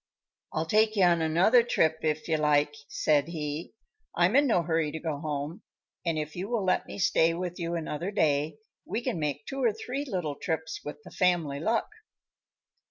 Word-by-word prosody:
"I'll 160 - -1
take 215 +5 +3
you 195 - +4
on 170 -2 +4
another 175 +10 +5
trip, 160 -9 +1
if 155 -1 -1
you 160 -2 +2
like," 150 -1 +3 0.2
said 145 -1 +2
he, 155 +2 -5 0.4
"I'm 175 +6 +3
in 285 +1 +5
no 180 -8 +3
hurry 160 -2 0
to 160 - -4
go 155 -3 -3
home 150 +5 -4 0.4
and 165 -2 0
if 150 0 -4
you 185 +4 -4
will 230 -5 0
let 185 - +1
me - - -7
stay 165 -4 +3
with 175 0 -4
you 170 0 -2
another 165 +2 -3
day 155 -4 +1 0.3
we 235 - -3
can 240 -10 -2
make 145 -1 -2
two 270 0 -4
or 235 - +4
three 250 +6 -4
little 180 - -2
trips 160 0 -3
with 150 0 -8
the - - -12
family 170 -6 +1
luck." 225 +8 0
165 Hz, 190 wpm, -28 LUFS, 150-195 Hz, 0.4 s, another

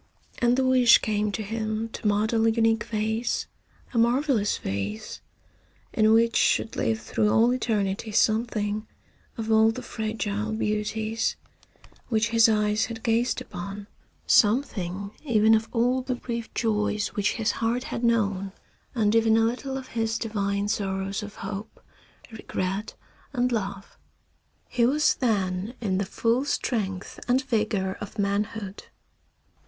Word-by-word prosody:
And 240 +1 +3
the 265 - +2
wish 255 -2 +6
came 210 -1 -1
to 220 - -2
him 220 +1 -2
to 220 - -4
model 220 +2 +2
a - - +5
unique 225 -1 +2
vase, 220 +2 -1 0.5
a 235 - +2
marvellous 240 -2 +2
vase, 100 +2 -4 0.7
in 215 0 +4
which 230 +1 +4
should 225 - +2
live 110 0 0
through 210 - 0
all 230 +3 +4
eternity 215 -4 -1
something 215 -1 +1 0.5
of 225 -1 -3
all 220 0 +6
the 250 +3 -4
fragile 220 -1 -3
beauties 220 +1 -1 0.7
which 225 -1 +1
his 230 0 +5
eyes 210 0 +2
had 225 -1 -8
gazed 230 +1 +1
upon; 200 +3 -7 0.4
something 200 -5 +2
even 220 -5 +4
of 220 0 +2
all 250 +2 +2
the 255 0 -2
brief 235 -2 -5
joys 210 -2 0
which 205 -1 0
his 225 -2 0
heart 230 +3 -1
had 235 - -5
known, 200 -5 +1 0.4
and 215 -3 +2
even 225 -1 +4
a - - +4
little 260 +3 -2
of 265 -1 -8
his 225 -1 -1
divine 200 -3 -1
sorrows 195 -1 -2
of 205 0 -8
hope, 205 +2 -6 0.5
regret 200 -2 -4 0.4
and 250 -1 +1
love. 200 -3 -4 0.7
He 240 - 0
was 290 +6 +4
then 200 -2 -1
in 195 -5 -1
the 200 - 0
full 230 +5 +1
strength 200 -9 -2
and 255 +2 +2
vigor 210 -6 -1
of 205 - -8
manhood. 200 0 -2
220 Hz, 140 wpm, -26 LUFS, 205-230 Hz, 0.7 s, wish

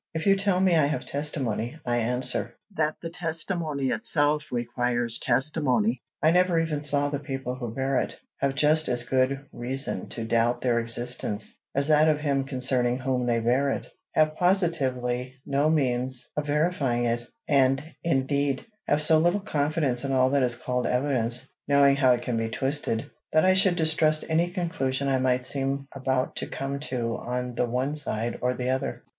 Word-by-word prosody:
If 160 - -2
you 195 -1 +5
tell 195 -2 +1
me 185 -2 +4
I 155 -3 +4
have 155 - -3
testimony, 135 -4 -3
I 120 -1 +1
answer, 125 +2 -1 0.2
that 155 -2 +1
the 165 - -4
testimony 165 -4 -1
itself 150 -8 +1
requires 120 -1 +1
testimony. 155 - +1 0.2
I 155 - +6
never 180 -1 +3
even 160 -3 -1
saw 145 -1 +1
the 145 -1 -2
people 135 -3 -4
who 125 -3 -5
bear 135 +2 0
it; - - -4 0.2
have 135 0 0
just 155 +2 +3
as 120 -1 -1
good 130 +2 0
reason 130 -4 -3
to 115 - -5
doubt 120 +1 +1
their 120 -2 +2
existence, 115 -2 -3 0.2
as 140 +2 +1
that 155 +1 +5
of 150 -1 +2
him 140 -2 0
concerning 130 -2 +1
whom 130 -1 -1
they 120 -1 +2
bear 125 +5 +2
it; - - -4 0.2
have 155 0 +3
positively 130 -9 +1
no 140 +2 +1
means 130 -4 0
of 150 0 -2
verifying 145 -6 +1
it, 120 0 0 0.3
and 135 +2 +2
indeed, 140 -3 0 0.2
have 150 +1 +2
so 160 0 +5
little 175 +5 +2
confidence 150 - -1
in 135 - -2
all 130 0 +3
that 140 -1 +3
is 125 -2 +1
called 125 +1 -2
evidence, 125 -1 0 0.2
knowing 140 -1 +5
how 135 -2 +4
it 120 0 -2
can 120 -2 -1
be 115 0 -1
twisted, 135 -3 -2 0.2
that 155 +3 +4
I 185 - +5
should 190 -1 +3
distrust 160 -1 +1
any 165 +2 +1
conclusion 140 -7 -2
I 135 -1 +2
might 130 -1 +1
seem 140 +1 -2
about 130 -1 -1
to - - -3
come 140 +1 -4
to 115 -2 -2
on 125 0 -4
the 120 - 0
one 130 +5 -1
side 120 -6 -2
or 125 0 +1
the 125 +1 -1
other. 130 +1 -3
135 Hz, 180 wpm, -26 LUFS, 125-155 Hz, 0.3 s, I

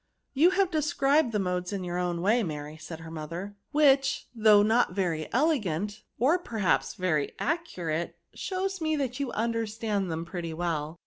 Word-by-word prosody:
" - - -51
You 305 +6 +5
have 380 -1 +2
described 305 -4 +2
the 215 - 0
modes 180 -2 -1
in 195 -2 -3
your 175 0 -2
own 175 -1 -1
way, 225 +5 +4
Mary," 150 -5 -5
said 160 +1 -9
her 165 0 -9
mother, 170 +6 -6
" - - -51
which, 275 -2 +3
though 215 -3 +6
not 225 +3 +3
very 165 -6 -1
elegant, 210 - 0 0.2
or 295 +10 +3
perhaps 190 - 0
very 160 -6 0
accurate, 175 - -2 0.2
shows 380 -1 -3
me 315 -1 +1
that 265 -3 -2
you 275 -3 -2
imderstand 220 -3 -1
them 165 +1 -3
pretty 170 -2 -5
well." 165 -1 -2
205 Hz, 175 wpm, -28 LUFS, 170-275 Hz, 0.2 s, though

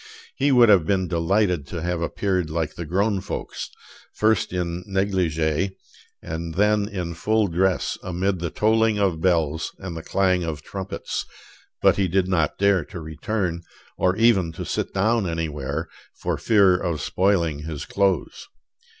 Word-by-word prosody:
He 140 +1 +2
would 120 -2 +7
have 95 -6 +5
been 95 -2 +1
delighted 85 -2 +1
to 85 +2 -5
have 90 -1 -1
appeared 90 0 -1
like 80 -1 -2
the 85 - -6
grown 100 +3 +1
folks, 95 - -5 0.5
first 110 -2 +2
in 90 -1 -3
negligee, 95 -3 0 0.5
and 80 0 -5
then 105 +1 +3
in 90 -5 -4
full 110 +6 +1
dress 95 0 0
amid 90 +1 -1
the 85 0 -2
tolling 110 +2 +2
of 95 -6 +1
bells 80 -3 +1
and 95 -3 -7
the 80 - -5
clang 90 +1 +1
of 75 -3 -4
trumpets; 95 +2 -5 0.6
but - - +5
he 95 -2 +2
did 90 +1 +1
not 85 -5 +1
dare 100 -3 +3
to 90 - -8
return, 85 +3 -3 0.3
or 95 0 +1
even 105 -7 +3
to - - -6
sit - - -2
down 105 0 +1
anywhere, 80 -1 -3 0.3
for - - -2
fear 100 -5 +4
of 85 -3 -2
spoiling 85 -4 +1
his 75 -1 -6
clothes. 95 -4 0
90 Hz, 155 wpm, -23 LUFS, 80-100 Hz, 0.6 s, would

